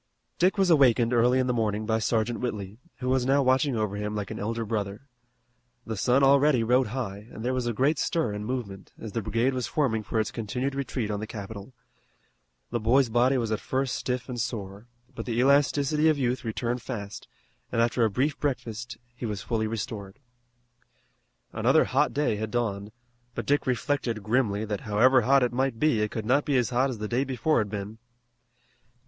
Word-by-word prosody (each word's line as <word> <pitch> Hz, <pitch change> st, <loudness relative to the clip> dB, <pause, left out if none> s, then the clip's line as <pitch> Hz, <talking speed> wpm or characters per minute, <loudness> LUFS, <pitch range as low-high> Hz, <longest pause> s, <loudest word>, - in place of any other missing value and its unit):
Dick 185 Hz, +4 st, +3 dB
was 190 Hz, -3 st, +3 dB
awakened 125 Hz, -5 st, +4 dB
early 120 Hz, +2 st, +4 dB
in 130 Hz, -, +2 dB
the 125 Hz, -, 0 dB
morning 110 Hz, -2 st, -1 dB
by 110 Hz, 0 st, +1 dB
Sergeant 115 Hz, +1 st, 0 dB
Whitley, 105 Hz, -3 st, -4 dB, 0.2 s
who 125 Hz, -, -2 dB
was 130 Hz, -1 st, +2 dB
now 135 Hz, +2 st, +3 dB
watching 130 Hz, +1 st, +2 dB
over 105 Hz, -2 st, -1 dB
him 105 Hz, +1 st, -3 dB
like 105 Hz, -2 st, -4 dB
an -, -, -5 dB
elder 115 Hz, +2 st, -2 dB
brother. 105 Hz, +2 st, -3 dB, 0.8 s
The 110 Hz, -, -4 dB
sun 125 Hz, +6 st, +2 dB
already 140 Hz, -2 st, +5 dB
rode 125 Hz, +2 st, +3 dB
high 105 Hz, -3 st, -5 dB
and 110 Hz, -, -7 dB
there 130 Hz, -, +1 dB
was 125 Hz, -2 st, -1 dB
a -, -, +1 dB
great 135 Hz, +6 st, +1 dB
stir 165 Hz, -, 0 dB
and 105 Hz, 0 st, -4 dB
movement, 105 Hz, -5 st, -5 dB
as 110 Hz, -, -7 dB
the 115 Hz, -, -2 dB
brigade 115 Hz, +5 st, 0 dB
was 125 Hz, -3 st, -2 dB
forming 125 Hz, -8 st, 0 dB
for 110 Hz, +1 st, -2 dB
its 110 Hz, -, -1 dB
continued 125 Hz, +5 st, -3 dB
retreat 125 Hz, -5 st, -3 dB
on 105 Hz, -, -2 dB
the 110 Hz, -, -5 dB
capital. 105 Hz, +3 st, -8 dB, 1.0 s
The 120 Hz, -, 0 dB
boy's 120 Hz, +3 st, +3 dB
body 125 Hz, +4 st, +3 dB
was 115 Hz, -3 st, -1 dB
at 110 Hz, -, 0 dB
first 130 Hz, -1 st, -1 dB
stiff 125 Hz, -1 st, -3 dB
and 125 Hz, -2 st, -3 dB
sore, 105 Hz, -2 st, -5 dB, 0.3 s
but 115 Hz, -1 st, -7 dB
the 115 Hz, -1 st, -2 dB
elasticity 145 Hz, +3 st, +3 dB
of 155 Hz, -, +2 dB
youth 125 Hz, -1 st, -1 dB
returned 120 Hz, +2 st, -2 dB
fast, 105 Hz, -6 st, -6 dB, 0.4 s
and -, -, -1 dB
after 115 Hz, +1 st, +2 dB
a 110 Hz, -, +3 dB
brief 135 Hz, +7 st, -1 dB
breakfast 120 Hz, -4 st, -3 dB, 0.2 s
he 120 Hz, -1 st, -5 dB
was 105 Hz, -2 st, -4 dB
fully 110 Hz, -2 st, -1 dB
restored. 105 Hz, -2 st, -5 dB, 1.4 s
Another -, -, +4 dB
hot -, -, +1 dB
day 145 Hz, -7 st, 0 dB
had 110 Hz, +1 st, -3 dB
dawned, 105 Hz, -3 st, -2 dB, 0.4 s
but -, -, -4 dB
Dick 145 Hz, -1 st, +1 dB
reflected 125 Hz, -4 st, -1 dB
grimly 110 Hz, -2 st, +1 dB
that 105 Hz, -2 st, -3 dB
however 125 Hz, +5 st, +4 dB
hot 135 Hz, +3 st, +4 dB
it 120 Hz, -, 0 dB
might 130 Hz, -1 st, 0 dB
be 150 Hz, -8 st, +2 dB
it 105 Hz, -, 0 dB
could 110 Hz, 0 st, -5 dB
not 140 Hz, +6 st, +3 dB
be 140 Hz, -3 st, +1 dB
as 120 Hz, -3 st, +1 dB
hot 130 Hz, +3 st, +2 dB
as 125 Hz, -, -4 dB
the 105 Hz, 0 st, -4 dB
day 120 Hz, +4 st, +1 dB
before 135 Hz, +2 st, +1 dB
had 105 Hz, -2 st, -1 dB
been. 105 Hz, +2 st, -6 dB
120 Hz, 200 wpm, -27 LUFS, 110-130 Hz, 1.4 s, already